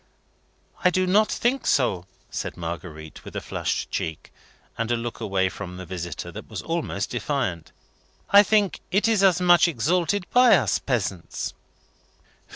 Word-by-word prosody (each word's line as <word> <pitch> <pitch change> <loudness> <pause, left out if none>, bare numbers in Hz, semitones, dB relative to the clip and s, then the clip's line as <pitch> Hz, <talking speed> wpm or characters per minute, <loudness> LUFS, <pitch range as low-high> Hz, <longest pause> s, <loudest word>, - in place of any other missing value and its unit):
"I 180 - +6
do 185 +1 +1
not 210 +4 +3
think 250 +3 0
so," 95 -9 +1 0.2
said - - -4
Marguerite, 80 -2 -7
with - - -11
a - - -1
flushed - - -3
cheek, 80 -2 -4 0.4
and 115 0 -2
a 120 - +2
look 115 0 -5
away 95 -4 +1
from 90 -1 -7
the 95 - -7
visitor, 90 -1 -6
that - - -10
was - - -6
almost 165 -11 -2
defiant. 120 - -2 0.6
"I 200 +1 +9
think 210 -2 +2
it 205 +4 +2
is 220 -3 +3
as 185 -3 +5
much 175 -1 +6
exalted 175 - 0
by 250 0 +7
us - - +1
peasants." - - -3
135 Hz, 155 wpm, -24 LUFS, -, 0.6 s, I